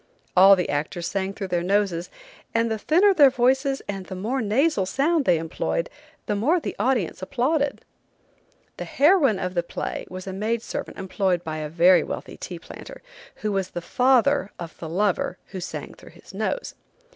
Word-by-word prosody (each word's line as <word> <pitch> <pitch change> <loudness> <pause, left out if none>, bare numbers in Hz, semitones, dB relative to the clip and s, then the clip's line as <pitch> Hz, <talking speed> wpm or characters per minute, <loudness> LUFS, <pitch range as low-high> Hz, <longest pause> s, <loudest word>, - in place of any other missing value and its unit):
All 195 +2 +8
the 180 -2 -1
actors 155 +4 -2
sang 195 0 -2
through 195 -1 -6
their 175 -1 0
noses, 185 -2 0 0.5
and 230 0 +2
the 220 - -2
thinner 370 - +4
their 290 -6 +7
voices 265 +2 +1
and 195 -2 -5
the 190 - -6
more 230 +8 -2
nasal 220 - +1
sound 285 - +1
they 175 - +4
employed 165 +1 -2 0.3
the 210 - -1
more 290 - +2
the - - -5
audience 220 -7 0
applauded. 275 +8 -1 0.9
The - - -5
heroine 290 - +4
of 185 -1 -3
the 175 - +1
play 170 - -5
was 185 0 -7
a 190 - -5
maid 220 +4 -2
servant - - -6
employed 190 -2 -1
by 155 -2 -4
a 155 -1 -4
very 175 +3 +5
wealthy - - -6
tea - - -7
planter, - - -11 0.4
who 210 - +1
was 195 -2 -1
the - - -5
father 255 +4 +2
of 170 -2 -8
the 160 - -6
lover 185 0 0
who 190 - -6
sang 175 - -6
through - - -16
his - - -15
nose. - - -3
200 Hz, 180 wpm, -24 LUFS, 180-265 Hz, 0.9 s, All